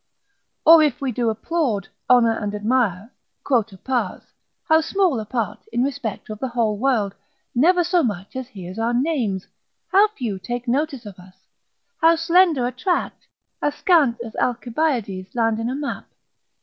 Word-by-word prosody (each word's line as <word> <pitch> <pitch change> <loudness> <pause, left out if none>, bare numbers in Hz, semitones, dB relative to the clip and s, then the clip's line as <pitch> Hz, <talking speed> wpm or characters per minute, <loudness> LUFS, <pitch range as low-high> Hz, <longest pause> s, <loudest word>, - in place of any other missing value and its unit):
Or 325 0 +9
if 295 -3 +1
we 275 -3 -2
do 235 0 0
applaud, 225 - -1 0.2
honour 235 -2 +5
and 210 -2 -3
admire, 215 -1 0 0.3
quota 225 -7 0
pars, 240 -2 -2 0.4
how 320 0 +5
small 360 - +1
a 215 - -6
part, 220 -2 -3
in 240 +1 +1
respect 235 -6 -4
of 215 - -7
the 265 - -2
whole 230 -3 0
world, 225 -6 +1 0.4
never 350 +8 +4
so 350 +1 +2
much 205 - -3
as 260 -1 -4
hears 190 -4 -9
our 235 +1 0
names, 245 - -1 0.5
how 395 +2 +6
few 240 - -5
take 240 +5 -5
notice 270 -1 -1
of 200 -3 -10
us, 185 +1 -16 0.7
how 330 +1 +6
slender 330 -4 +3
a 245 - -1
tract, 350 +9 -2 0.3
as 290 0 0
scant 295 -11 +3
as 225 - -10
Alcibiades' 240 -6 -1
land 225 -2 +1
in 225 +1 -2
a 260 - -2
map! 285 0 -5
245 Hz, 160 wpm, -22 LUFS, 215-295 Hz, 0.7 s, Or